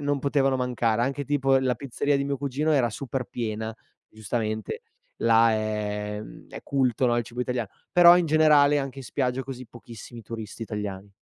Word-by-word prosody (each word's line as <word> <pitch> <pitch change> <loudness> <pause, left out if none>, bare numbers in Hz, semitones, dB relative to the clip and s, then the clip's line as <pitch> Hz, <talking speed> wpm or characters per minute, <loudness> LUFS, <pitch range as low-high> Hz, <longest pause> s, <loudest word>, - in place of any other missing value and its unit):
non 145 -1 -1
potevano 135 -1 +1
mancare. 120 -3 0
Anche 140 +3 -2
tipo, 135 -1 +2
la 130 -1 +1
pizzeria 140 +3 -1
di 140 - -1
mio 140 0 -2
cugino, 140 +3 -1
era 130 -5 +3
super 130 +2 -4
piena, 110 -2 -4 0.3
giustamente. 110 0 -4 0.3
Là, 115 0 +4
è, 105 -1 -2
mhmm, - - -13
è - - -9
culto, 130 -2 +1
no, 120 - +2
il 120 - 0
cibo 120 +1 -7
italian 125 -2 -2 0.2
però, 175 0 +8
in 175 -1 +1
generale 150 -2 +5
anche 135 -1 -5
in 135 - -8
spiaggia, 125 +1 -1
così, 130 -2 -8
pochissimi 115 0 -11
turisti 110 0 -7
italiani. 100 -2 -6
125 Hz, 175 wpm, -26 LUFS, 110-140 Hz, 0.3 s, però